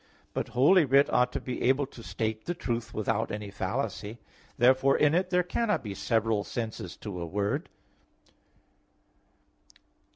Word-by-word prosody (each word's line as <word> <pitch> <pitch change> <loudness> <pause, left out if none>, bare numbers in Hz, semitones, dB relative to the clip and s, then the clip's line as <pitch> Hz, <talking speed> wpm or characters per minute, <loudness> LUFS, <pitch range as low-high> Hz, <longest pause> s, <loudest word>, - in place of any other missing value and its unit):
But - - -2
Holy 165 +8 +6
Writ 140 +1 +4
ought 125 - +3
to - - -1
be 125 - -5
able 135 +3 +3
to 130 -3 -13
state 110 -1 -3
the 175 - -1
truth 120 -7 -3
without 110 +1 -1
any 105 -1 -5
fallacy. 105 +2 -3 0.4
Therefore 130 +3 +4
in 150 0 +4
it 180 +2 +1
there 180 -1 +2
cannot 210 - 0
be 105 -3 -5
several 110 -1 0
senses 110 -6 -5
to 95 -5 -6
a - - -3
word. 100 +4 -2
120 Hz, 150 wpm, -28 LUFS, 105-140 Hz, 0.4 s, Holy